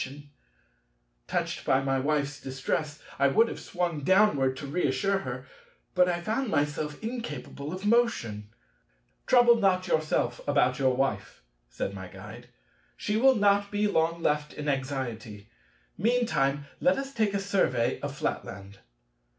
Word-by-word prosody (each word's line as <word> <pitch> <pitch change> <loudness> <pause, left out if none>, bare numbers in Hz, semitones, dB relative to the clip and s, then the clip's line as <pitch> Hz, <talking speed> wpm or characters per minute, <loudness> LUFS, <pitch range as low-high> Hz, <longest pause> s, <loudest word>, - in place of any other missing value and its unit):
Touched - - -2
by 130 - +3
my 135 -1 0
Wife's 145 +1 -1
distress, 145 +3 -3 0.2
I 140 - +5
would 225 +12 +4
have - - -6
sprung 175 -4 -2
downward 150 -8 +3
to 140 - -6
reassure 150 +5 0
her, 130 -4 -6 0.5
but 180 0 +4
I 175 -1 -1
found 225 +7 -1
myself 150 -1 -1
incapable 155 - -5
of 185 +3 -6
motion. 205 - +1 0.8
"Trouble 240 -2 +6
not 190 -4 +2
yourself 155 -6 0
about 140 -2 +2
your 130 -2 +2
Wife," 105 - -2 0.3
said 100 - -4
my 95 -2 -7
Guide: 105 +6 -11 0.5
"she 210 - -2
will 260 +4 +5
not 200 -1 +3
be 205 +1 0
long 165 -3 +1
left 150 0 0
in 150 - -6
anxiety; 120 -6 -4 0.5
meantime, 175 - +1
let 270 +1 +3
us 275 0 -5
take 215 -4 +1
a - - +1
survey 185 -12 +1
of - - -5
Flatland." 100 0 -5
150 Hz, 140 wpm, -28 LUFS, 130-200 Hz, 0.8 s, Trouble